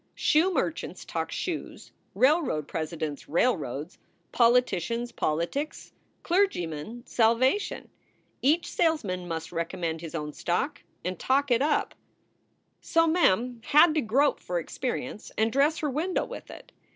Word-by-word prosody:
Shoe 330 +5 +3
merchants 335 -1 -2
talk - - -3
shoes: - - -5 0.2
railroad 265 - +2
presidents, 155 -3 -4
railroads; 155 - 0 0.3
poli 240 +1 +5
ticians, 230 +4 -3
politics; 170 - -2 0.3
clergymen, 235 - -1
salvation. 245 - +2 0.5
Each 310 +6 +3
salesman 200 - 0
must 165 -1 -4
recommend 165 -1 -3
his 165 -1 -7
own 150 -2 -4
stock 230 - -2 0.2
and 180 -1 -3
talk 275 +1 +1
it 240 +1 +4
up. 295 +1 +1 0.9
So 330 0 +2
Mem 250 - +2
had 305 +2 +6
to 310 - +1
grope 275 +6 +2
for 180 - -3
experience 250 +6 -4
and 220 +1 +2
dress 290 +4 +3
her 300 - -1
window 335 +7 -1
with - - -9
it. - - -12
240 Hz, 125 wpm, -27 LUFS, -, 0.9 s, had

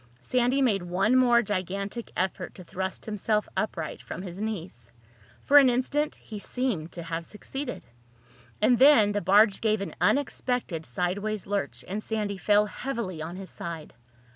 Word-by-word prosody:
Sandy 255 - +2
made 210 -7 +2
one 185 +7 +1
more 240 -2 +5
gigantic 200 +3 -3
effort 185 -1 -2
to 185 - -10
thrust 190 +2 -4
himself 210 0 0
upright 170 -7 -3
from 180 - -7
his 185 +1 -7
knees. 180 - -5 0.5
For 290 +1 +8
an 270 -2 +6
instant 270 +5 0
he 215 -2 -9
seemed 205 -9 -2
to 170 - -6
have 165 0 -4
succeeded. 250 - -6 0.8
And 245 -2 +4
then 260 -7 +7
the 205 0 -1
barge 200 +2 +5
gave 215 -1 +2
an 200 - -5
unexpected 245 - 0
sideways 190 - -2
lurch 200 0 -3
and 200 +3 -3
Sandy 210 -3 -3
fell 210 +1 +4
heavily 210 -7 -4
on 165 +3 -5
his 190 0 -8
side. 165 -2 -7
205 Hz, 155 wpm, -27 LUFS, 185-240 Hz, 0.8 s, For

